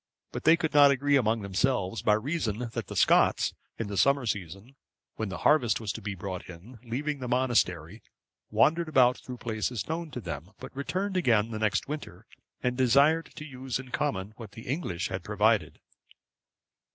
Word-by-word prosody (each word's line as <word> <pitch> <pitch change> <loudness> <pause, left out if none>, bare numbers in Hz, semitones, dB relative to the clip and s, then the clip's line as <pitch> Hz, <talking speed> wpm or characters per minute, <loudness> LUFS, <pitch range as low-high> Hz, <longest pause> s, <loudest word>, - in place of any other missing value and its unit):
But - - -6
they 165 +1 +7
could 160 -2 -2
not 145 -1 +8
agree 140 +1 +2
among 115 -4 +2
themselves, 100 +1 0
by 105 - +4
reason 120 -3 -2
that - - -4
the - - -7
Scots, - - +3 0.2
in 115 - -3
the 100 -1 -5
summer 140 -2 +3
season, 100 +3 -5 0.4
when 110 -2 -3
the 95 - -5
harvest 145 -7 +4
was 110 -3 -3
to - - -7
be 105 -1 -4
brought 90 -1 -6
in, 100 +8 -12
leaving 140 +5 -3
the 125 - -5
monastery, 115 -7 0 0.5
wandered 155 +10 +2
about 125 -4 +4
through 125 -1 -8
places 110 -2 -3
known 165 +1 -3
to 125 - -6
them; 85 -2 -7
but - - -10
returned 185 +8 -2
again 115 - +2
the 110 - -4
next 110 +1 0
winter, 125 - -7 0.4
and 125 -1 0
desired 140 +6 +3
to 155 - -8
use 130 -3 -4
in 130 0 -9
common 105 -9 -2
what 110 -4 -10
the 115 - -10
English 125 - -2
had 95 -1 -4
provided. 105 -4 +1
120 Hz, 180 wpm, -28 LUFS, 105-140 Hz, 0.5 s, not